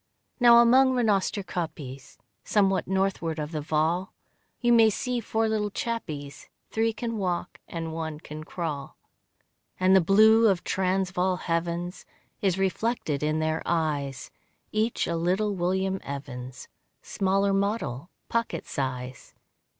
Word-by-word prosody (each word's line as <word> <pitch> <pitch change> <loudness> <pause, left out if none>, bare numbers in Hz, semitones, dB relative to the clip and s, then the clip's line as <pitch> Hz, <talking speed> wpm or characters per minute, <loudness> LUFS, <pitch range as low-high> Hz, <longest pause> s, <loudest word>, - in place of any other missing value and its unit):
Now 240 -1 +8
among 260 +3 +6
Rhenoster 210 -4 +1
kopjes 150 -7 -6 0.3
Somewhat 195 -3 +2
northward 190 -4 0
of 150 0 -4
the 155 -2 -3
Vaal, 160 +5 0 0.4
You 240 -1 +3
may 225 -1 +7
see 250 +3 -2
four 225 0 0
little 215 -1 0
chappies, 155 -11 -5 0.2
Three 225 +1 +1
can 230 0 -4
walk 180 -2 -2
and 165 -1 -5
one 160 -2 -4
can 155 -1 -8
crawl. 155 -5 -5 0.8
And 185 +1 +5
the 190 - +7
blue 220 +5 +6
of 190 -4 +2
Transvaal 185 -1 0
heavens 175 +1 -3 0.3
Is 190 -3 +1
reflected 195 - -1
in 155 +1 0
their 155 0 0
eyes, 145 -5 -2 0.4
Each 220 +2 0
a 170 - -2
little 185 +5 +1
William 190 +1 0
Evans, 130 -3 -7 0.4
Smaller 195 +1 +1
model 195 - -1 0.2
pocket 230 0 -2
size. 130 -2 -5
185 Hz, 125 wpm, -27 LUFS, 155-210 Hz, 0.8 s, Now